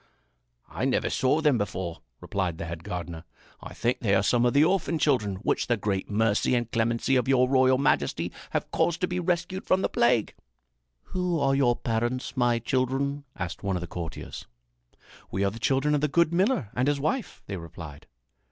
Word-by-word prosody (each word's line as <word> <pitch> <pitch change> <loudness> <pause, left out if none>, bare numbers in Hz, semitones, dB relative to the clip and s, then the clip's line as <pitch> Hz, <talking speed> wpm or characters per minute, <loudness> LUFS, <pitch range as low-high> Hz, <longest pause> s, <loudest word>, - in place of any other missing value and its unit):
"I - - -3
never - - +1
saw 135 +4 +2
them 145 -6 +3
before," 90 -4 -4 0.2
replied 90 -1 -2
the 85 - -5
head 85 0 -6
gardener. 85 -2 -5 0.4
"I - - -9
think 120 +2 0
they 100 -3 +2
are 95 - +3
some 120 +3 +3
of 120 - +1
the 145 - +5
orphan 175 -1 +1
children 120 -10 +1
which - - 0
the 120 - +2
great 100 -2 -2
mercy 110 +3 +2
and 120 -1 -1
clemency 115 +3 +1
of 125 - 0
your 130 -1 +4
royal 130 0 +4
majesty 140 - +1 0.2
have - - -3
caused 170 0 +1
to 180 - +2
be 180 0 -2
rescued 180 +2 -1
from 190 +1 +2
the - - +1
plague." 120 -2 +2 0.7
"Who 180 - -1
are 135 -1 +2
your 130 -3 +3
parents, 120 +4 -2
my 120 -2 +2
children?" 135 +4 -1
asked 85 -2 -5
one 100 -2 -1
of - - -5
the - - -4
courtiers. 85 -2 -7 0.8
"We 95 - -1
are 100 - +1
the 115 - -9
children 135 +5 +2
of 145 - +1
the 150 - +2
good 170 +3 +2
miller 185 - +1
and 125 +2 0
his 145 -1 +1
wife," 170 - -2
they 100 - -5
replied. 80 -3 -10
125 Hz, 195 wpm, -27 LUFS, 100-145 Hz, 0.8 s, the